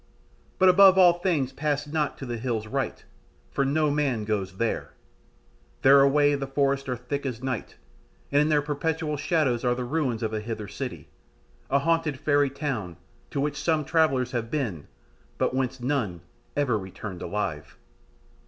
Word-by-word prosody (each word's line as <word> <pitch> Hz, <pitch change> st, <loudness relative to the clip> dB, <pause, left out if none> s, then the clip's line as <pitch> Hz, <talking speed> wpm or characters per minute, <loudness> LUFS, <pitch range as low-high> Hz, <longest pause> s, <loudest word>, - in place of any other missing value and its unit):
But 190 Hz, -, +5 dB
above 190 Hz, +1 st, +7 dB
all 175 Hz, -2 st, +6 dB
things 155 Hz, -8 st, 0 dB
pass 145 Hz, 0 st, -1 dB
not 150 Hz, 0 st, -2 dB
to 135 Hz, -, -7 dB
the 120 Hz, -2 st, -4 dB
hills 115 Hz, -3 st, -2 dB
right, 110 Hz, -, -3 dB, 0.5 s
for 140 Hz, -, +1 dB
no 150 Hz, +2 st, +1 dB
man 135 Hz, -7 st, 0 dB
goes 100 Hz, -4 st, -2 dB
there; 115 Hz, +1 st, -2 dB, 0.9 s
there 140 Hz, +1 st, +8 dB
away 145 Hz, +1 st, +4 dB
the 140 Hz, -1 st, -2 dB
forests 135 Hz, 0 st, 0 dB
are 125 Hz, -, 0 dB
thick 140 Hz, +4 st, -4 dB
as 125 Hz, -3 st, -4 dB
night, 130 Hz, -3 st, -3 dB, 0.6 s
and 145 Hz, +1 st, +4 dB
in 150 Hz, -, +2 dB
their 150 Hz, -2 st, +3 dB
perpetual 150 Hz, +1 st, -2 dB
shadows 145 Hz, -5 st, 0 dB
are 125 Hz, -1 st, +2 dB
the 125 Hz, -, -3 dB
ruins 125 Hz, -4 st, -1 dB
of 110 Hz, 0 st, -2 dB
a 110 Hz, -, -2 dB
Hither 110 Hz, -1 st, -5 dB
city, 125 Hz, +5 st, -6 dB, 0.6 s
a 140 Hz, -, +3 dB
haunted 160 Hz, -1 st, 0 dB
fairy 145 Hz, -1 st, +2 dB
town 125 Hz, -, -4 dB, 0.3 s
to 140 Hz, -, -3 dB
which 145 Hz, +1 st, -1 dB
some 155 Hz, -2 st, +1 dB
travellers 135 Hz, -6 st, +2 dB
have 115 Hz, -2 st, -3 dB
been, 115 Hz, -, -3 dB, 0.5 s
but -, -, 0 dB
whence 130 Hz, 0 st, -1 dB
none 120 Hz, -, -1 dB, 0.4 s
ever 125 Hz, -7 st, +1 dB
returned 95 Hz, -1 st, -8 dB
alive." 80 Hz, -8 st, -4 dB
135 Hz, 165 wpm, -26 LUFS, 115-150 Hz, 0.9 s, there